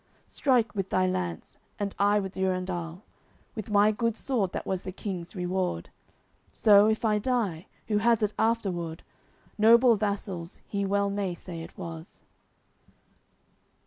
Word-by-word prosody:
Strike 250 -5 +1
with 195 -3 -3
thy 185 0 +2
lance, 185 -2 -3 0.2
and 200 -1 -3
I 205 +1 +4
with 190 -1 -4
Durendal, 185 -1 -2 0.5
With 215 -3 -6
my 205 +1 +5
good 230 +1 -1
sword 225 -9 -1
that - - -4
was 190 -1 -2
the 185 - -6
King's 185 -1 -6
reward. 180 - -2 0.6
So, 205 -1 +6
if 220 +1 0
I 210 -1 +3
die, 205 -8 -1 0.2
who 210 -2 +2
has 230 0 +3
it 210 0 0
afterward 180 -8 -1 0.6
Noble 235 +2 +7
vassal's 195 -4 -3
he 200 -1 -2
well 200 0 +1
may 200 -3 -2
say 170 -1 -8
it 165 - -11
was." 165 -2 -9
200 Hz, 145 wpm, -28 LUFS, 180-215 Hz, 0.6 s, Noble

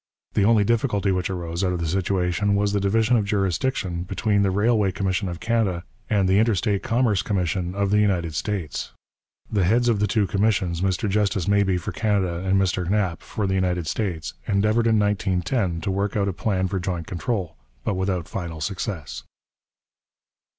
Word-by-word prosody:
The 100 - +3
only 110 -1 +5
difficulty 105 -3 +1
which 90 0 -1
arose 85 -1 -3
out 90 -1 +1
of 90 - -2
the 85 - -2
situation 95 +2 0
was 100 0 +1
the 100 - +2
division 110 +5 +2
of 110 - +1
jurisdiction 95 -2 -1
between 100 +3 0
the 100 - +3
Railway 105 0 +2
Commission 95 0 -1
of 85 -1 -6
Canada 110 -7 0 0.3
and 100 -3 +2
the 95 +2 +4
Interstate 105 -2 +1
Commerce 115 -5 +1
Commission 90 -2 -1
of 100 -1 0
the 105 - +4
United 90 -6 +1
States. 85 -3 -3 0.6
The 100 -3 +2
heads 120 +7 +3
of 110 -3 +2
the 105 - +2
two 105 +1 +2
commissions, 95 -4 0
Mr 95 +2 0
Justice 100 -3 0
Mabee 100 -2 +3
for - - -4
Canada 100 -6 0
and 95 +1 +1
Mr 90 -2 0
Knapp 95 -4 0
for 105 - -3
the 95 - 0
United 90 -3 0
States, 85 -1 -3
endeavoured 105 +3 +2
in 110 -1 +4
1910 95 -2 0
to 95 - -1
work 100 +1 -1
out 100 -1 +1
a 100 - -1
plan 95 0 0
for 95 +1 -2
joint 90 -2 -3
control, 90 0 -3 0.3
but - - 0
without 95 -3 -1
final 85 -4 -5
success. 95 - -4
95 Hz, 180 wpm, -24 LUFS, 90-105 Hz, 0.6 s, only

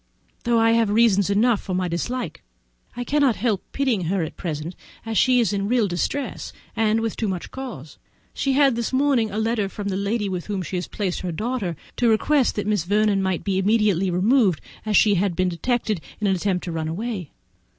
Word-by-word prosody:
though 235 0 +3
I 225 0 +4
have 230 -2 +3
reasons 205 -3 +3
enough 215 +2 +3
for 185 - -4
my 180 0 0
dislike, 240 +9 -3 0.6
I 245 - -2
cannot 275 -2 +2
help 215 -4 0
pitying 250 -10 0
her 185 +1 0
at 155 - -6
present, 160 0 -5 0.3
as 225 0 -3
she 250 +4 +4
is 230 -3 +1
in 200 0 -1
real 235 -2 +2
distress, 195 +10 -3 0.2
and 225 0 +2
with 225 -1 -2
too 220 - -2
much 185 -3 -4
cause. 230 - -8 0.3
She 275 - 0
had 275 -2 +4
this 235 -1 -2
morning 260 -4 +2
a 205 - -5
letter 220 -2 0
from 200 0 -5
the 190 - -1
lady 205 +2 -1
with 180 -3 -4
whom 200 -3 -2
she 185 - -5
has 180 - -2
placed 195 -5 -3
her 180 - -3
daughter, 210 -1 -2 0.2
to 240 - +3
request 260 +5 +2
that 205 - -2
Miss 210 -5 +1
Vernon 205 +1 +2
might 190 -2 -1
be 190 -2 0
immediately 200 -2 +2
removed, 195 - +3 0.3
as 210 -2 +3
she 210 - +5
had 195 -4 0
been 185 0 +1
detected 215 +1 -1 0.2
in 215 - -2
an 195 -1 +3
attempt 185 0 -1
to 175 - -4
run 160 -1 -3
away. 190 -1 -4
210 Hz, 210 wpm, -23 LUFS, 185-235 Hz, 0.6 s, she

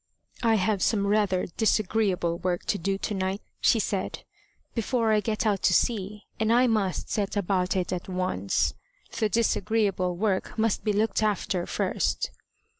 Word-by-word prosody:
"I 230 -2 +3
have 200 0 +1
some 200 -1 +2
rather 200 -3 +2
disagreeable 195 -4 0
work 180 -1 -2
to 200 - 0
do 195 +3 -1
to 210 - -3
night," 190 +1 -2 0.2
she - - +4
said, - - -2 0.5
"before 230 0 +1
I 215 - +4
get 215 +1 -2
out 205 -3 +1
to 180 - +4
sea, 210 -2 0 0.2
and 220 0 +2
I 245 +2 +5
must 215 -6 0
set 205 -1 -1
about 185 -1 0
it 185 -1 -1
at 180 +1 -5
once. 100 - 0 0.5
The 215 -2 +2
disagreeable 200 -4 +1
work 195 +1 -1
must 220 -1 +1
be 215 - +1
looked 215 +2 +1
after 195 -4 0
first." - - -1
200 Hz, 160 wpm, -27 LUFS, 185-220 Hz, 0.5 s, I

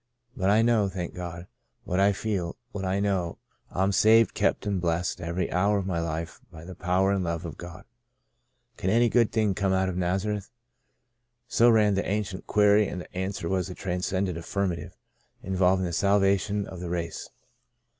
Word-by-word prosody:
But 95 -6 0
I 110 +2 +4
know, 115 -4 +3
thank 90 -2 -5
God, 85 -1 -7 0.4
what 90 - -1
I 100 +1 +5
feel 95 -4 -3
— 120 - -49
what 100 - -5
I 95 +1 0
know. 95 -4 -1 0.3
I'm 95 +2 0
saved, 110 +2 +5
kept, - - 0
and 100 -3 -1
blessed 85 +1 -1
every 85 +2 -2
hour 100 +3 +2
of 100 - -2
my 90 -3 -1
life 85 0 -4
by 80 +1 -11
the 95 - -8
power 90 +2 +1
and 100 -2 0
love 85 0 -3
of 80 -4 -6
God." 90 +2 -9 0.5
" 120 0 -45
Can 95 - -1
any 115 +3 +4
good 115 -2 +3
thing 110 -3 +1
come 95 0 0
out 95 0 +1
of 90 - -4
Naza 95 +4 0
reth?" 100 -2 -6 1.0
So 120 0 +4
ran 105 -3 +4
the 100 0 -1
ancient 100 -2 -3
query, 105 0 +4
and 90 - -5
the - - -14
answer 95 -2 -3
was 95 +1 -1
a 90 - -7
transcendent 95 -1 -2
affirmative, 90 0 -3 0.5
in 95 0 -3
volving 95 0 +3
the 85 -1 -3
salvation 100 +2 +2
of 95 - -9
the 90 -1 -5
race. 85 -1 -4
95 Hz, 195 wpm, -27 LUFS, 90-105 Hz, 1.0 s, I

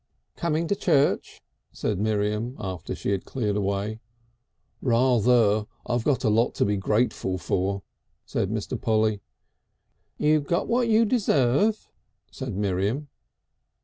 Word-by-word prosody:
"Coming 165 0 -1
to 200 - +1
church?" 155 -8 +1 0.3
said 105 -4 -2
Miriam 105 +3 -1
after 95 -6 -5
she - - -3
had 100 -2 -1
cleared 105 -6 -2
away. 100 +2 -2 0.8
"Rather. 115 -3 +3 0.2
I 120 0 0
got 130 +2 0
a - - +3
lot 115 +3 +2
to - - +2
be 105 0 +1
grateful 100 -2 0
for," 95 +2 -1 0.4
said - - -1
Mr. - - -3
Polly. 110 -2 +1 1.0
"You 155 +1 +3
got 170 +5 -1
what 240 0 +2
you 225 0 +4
deserve," 205 - +2 0.4
said 130 -7 -5
Miriam. 100 +8 -1
115 Hz, 125 wpm, -25 LUFS, 100-145 Hz, 1.0 s, you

